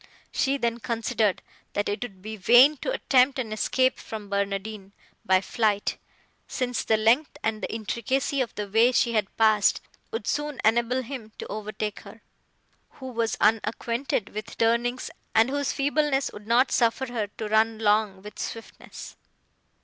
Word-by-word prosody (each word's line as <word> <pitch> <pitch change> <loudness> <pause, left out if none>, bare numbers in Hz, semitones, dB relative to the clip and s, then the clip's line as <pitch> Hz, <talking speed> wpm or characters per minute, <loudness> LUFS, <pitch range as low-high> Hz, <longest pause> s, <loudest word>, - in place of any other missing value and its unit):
She 275 +1 +1
then 235 -2 -1
considered 225 -3 -1 0.3
that 205 - -1
it 205 - -2
would 195 -6 -7
be 220 +1 -5
vain 245 +9 +6
to - - -3
attempt 265 - +3
an 230 -5 -3
escape 255 +4 +1
from 215 -2 -8
Barnardine 200 0 -3 0.3
by 185 0 +3
flight, 210 -1 0 0.5
since 250 -2 -2
the 220 - +2
length 235 +7 +2
and 220 -1 -1
the - - -4
intricacy 245 +5 -1
of 245 - -3
the 210 -1 -4
way 225 +5 +4
she 235 -1 +2
had 215 -3 -1
passed 215 -2 +4 0.3
would 455 - -5
soon 295 -2 -2
enable 240 +3 +2
him 235 -4 -8
to - - -6
overtake 215 0 -4
her, - - -14 0.7
who 260 -1 -8
was 230 -1 -1
unacquainted 225 +2 0
with 215 +1 -6
the - - -11
turnings, 235 +2 0 0.2
and 225 +3 +4
whose 285 -1 0
feebleness 285 -1 +1
would 210 0 -11
not 245 +3 +3
suffer 240 +2 +2
her 215 -3 -1
to 220 - -4
run 220 +1 +2
long 210 -3 +1
with 210 - -10
swiftness. 225 - -8
225 Hz, 160 wpm, -26 LUFS, 215-255 Hz, 0.7 s, vain